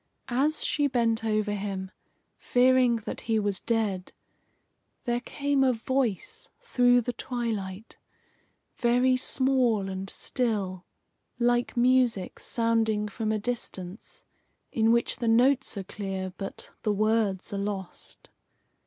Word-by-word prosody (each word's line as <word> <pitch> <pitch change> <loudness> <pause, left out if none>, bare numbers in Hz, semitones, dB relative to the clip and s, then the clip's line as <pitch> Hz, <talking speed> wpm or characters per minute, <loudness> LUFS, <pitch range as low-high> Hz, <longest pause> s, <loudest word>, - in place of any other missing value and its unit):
As 295 +5 +1
she 290 -1 +2
bent 230 -4 +1
over 215 -1 0
him, 195 -2 -4 0.5
fearing 250 -1 +4
that - - -5
he 225 -1 0
was 205 -3 +1
dead, 210 -6 -1 0.9
there 240 -1 0
came 280 +2 0
a 260 -1 +4
voice 235 -3 -2
through 245 -1 +3
the 245 +1 -3
twilight, 220 -5 -4 0.8
very 250 +2 +3
small 255 -6 +1
and 190 0 -5
still, 200 -9 -2 0.5
like 240 0 +1
music 245 -6 +2
sounding 225 -2 0
from 215 +1 -2
a 215 - +1
distance, 205 -4 -6 0.5
in 225 0 +3
which 235 0 +1
the 235 - -2
notes 250 +2 +3
are 195 - -3
clear 190 -1 -5
but 195 - -7
the 215 - +1
words 215 -2 +1
are 200 - -2
lost. 200 -2 -6
225 Hz, 120 wpm, -27 LUFS, 200-245 Hz, 0.9 s, fearing